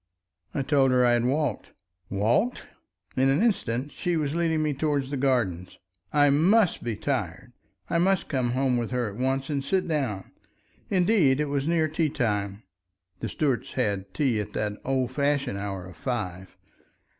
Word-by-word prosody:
I 140 - 0
told 135 -1 +3
her 125 -1 +4
I 120 - +4
had 120 0 +2
walked. 140 -2 -1 0.4
"Walked!" 115 - +1 0.5
In 135 +1 +3
an 135 - +3
instant 145 - 0
she 175 -1 -1
was 150 -2 -1
leading 165 -2 +1
me 150 -1 0
towards 140 -1 -1
the - - -1
gardens. 120 -10 0 0.3
I 145 -1 +4
must 180 +7 +3
be 115 -2 -2
tired. 120 - -3 0.3
I 170 - +1
must 190 +1 +2
come 125 -4 0
home 130 -1 +1
with 120 -2 -2
her 125 -3 -1
at - - -11
once 135 +3 -1
and 140 -2 -1
sit 185 +5 0
down. 130 - -2 0.6
Indeed 180 -8 +3
it 150 -1 0
was 140 0 -1
near 165 -2 +2
tea 155 0 0
time 105 -6 -2 0.6
(the - - -3
Stuarts 140 -6 -1
had 100 -6 -1
tea 130 -5 +1
at 100 - -8
the 105 -1 -3
old 130 -2 0
fashioned 140 -6 0
hour 95 -2 -4
of 90 -2 -12
five). 95 -6 -4
135 Hz, 170 wpm, -26 LUFS, 115-150 Hz, 0.6 s, her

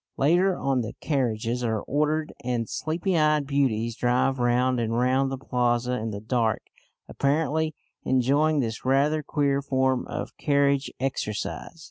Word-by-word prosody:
Later 175 +6 +3
on 135 -2 0
the 110 0 -5
carriages 125 -4 -1
are 110 -2 0
ordered, 150 +2 -1
and 120 -2 -1
sleepy 170 - -2
eyed 150 -2 +3
beauties 120 -5 0
drive 125 +2 +1
round 125 +1 +2
and 115 0 -1
round 130 +2 +2
the 135 - -3
plaza 125 -1 0
in 110 +1 -3
the 100 -2 -5
dark, 110 0 0 0.4
apparently 155 +2 0 0.3
enjoying 140 +4 +2
this 115 -3 -4
rather 140 +4 +2
queer 140 -1 0
form 130 -2 0
of - - -5
carriage 140 -2 +1
exercise. 130 +3 -3
135 Hz, 140 wpm, -26 LUFS, 120-145 Hz, 0.4 s, Later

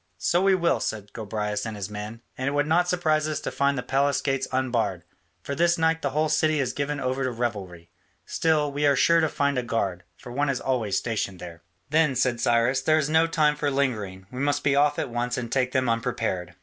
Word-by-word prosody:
"So 175 - +1
we 195 0 +4
will," 170 -2 +1
said 105 -2 -4
Gobryas 105 -1 -3
and 110 -2 -5
his 100 -2 -4
men, 105 +3 -7
"and 130 - -3
it 140 - 0
would 145 0 +2
not 170 +3 +2
surprise 155 -4 +1
us 155 -2 -2
to - - -4
find 140 0 +1
the 125 - -3
palace 140 +1 +1
gates 135 -1 -1
unbarred, 120 -8 -1 0.4
for 140 - -4
this 170 +4 +2
night 165 0 +1
the 140 - 0
whole 155 +3 +1
city 155 0 +2
is 125 -3 -1
given 145 0 -2
over 130 0 -1
to 130 - 0
revelry. 100 -8 -4 0.3
Still, 155 -3 +1
we 145 +1 +1
are 140 - +4
sure 170 +3 +4
to 160 -1 +2
find 140 -2 0
a - - 0
guard, 100 -7 -2
for 120 - -11
one 145 +3 0
is 130 -2 0
always 120 -7 -1
stationed 105 -5 -2
there." 85 -1 -9 0.3
"Then," 155 -3 +3
said 125 -1 +1
Cyrus, 120 +3 +2
"there 155 +3 +3
is 150 -1 0
no 160 +1 +4
time 155 -3 +2
for 150 -1 -1
lingering; 110 -9 -2
we 125 - -6
must 145 +1 0
be 140 -1 +2
off 145 +1 +3
at 135 - -3
once 120 +1 -2
and 120 -2 -4
take 130 -1 +1
them 130 -1 +1
unprepared." 115 -7 -2
130 Hz, 230 wpm, -25 LUFS, 115-150 Hz, 0.4 s, we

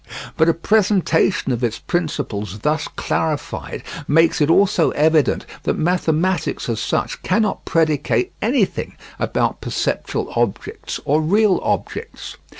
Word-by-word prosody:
But 160 +1 +3
a 165 - +2
presentation 185 -5 +2
of 120 0 -2
its 115 -2 0
principles 105 - -3
thus 155 +1 0
clarified 160 0 -3 0.2
makes 165 +1 +3
it 150 - +3
also 180 -1 +4
evident 155 -1 +2 0.2
that - - -1
mathematics 170 0 0
as 115 -3 -1
such 105 - -2
cannot 210 +3 0
predicate 155 -4 +1
anything - - 0 0.2
about - - -1
perceptual - - -2
objects 120 -4 -2
or 150 +3 +2
real 200 +4 +3
objects. 455 +1 -4
160 Hz, 120 wpm, -20 LUFS, 145-185 Hz, 0.2 s, also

